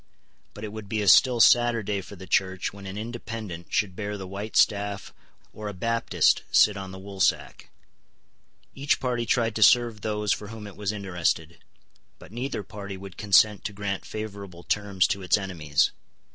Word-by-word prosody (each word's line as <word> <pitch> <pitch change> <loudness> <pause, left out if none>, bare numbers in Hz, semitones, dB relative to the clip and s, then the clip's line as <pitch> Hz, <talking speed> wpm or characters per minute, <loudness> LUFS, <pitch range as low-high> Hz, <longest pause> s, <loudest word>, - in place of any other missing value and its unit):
But 105 - -9
it 105 -1 -6
would 110 -2 -8
be 110 -1 -1
a - - -3
still 120 +6 +6
sadder 120 -1 +5
day 100 0 -2
for 100 - -11
the 95 0 -10
Church 95 0 0
when 100 -1 -10
an 95 +1 -6
Independent 110 -6 -6
should 95 -3 0
bear 105 +1 -4
the 95 - -7
white 100 +3 -7
staff 100 -2 +1 0.4
or 105 0 -7
a 105 - -6
Baptist 115 +5 +2
sit 105 - +5
on 95 -1 -6
the 95 - -9
woolsack. 95 0 -1 1.0
Each 140 +1 0
party 120 -3 -2
tried 115 0 +1
to - - -3
serve 115 -1 +5
those 105 -1 0
for 105 - -6
whom 110 0 -9
it 100 - -10
was 105 -1 -2
interested: 90 -5 -2 0.6
but - - -15
neither 120 -1 -4
party 100 0 -8
would 95 -1 -10
consent 105 0 +4
to 105 - -3
grant 100 -1 -3
favourable 100 -5 -7
terms 100 -2 +1
to 100 - -1
its 90 0 +3
enemies. 85 -7 0
100 Hz, 180 wpm, -26 LUFS, 95-110 Hz, 1.0 s, still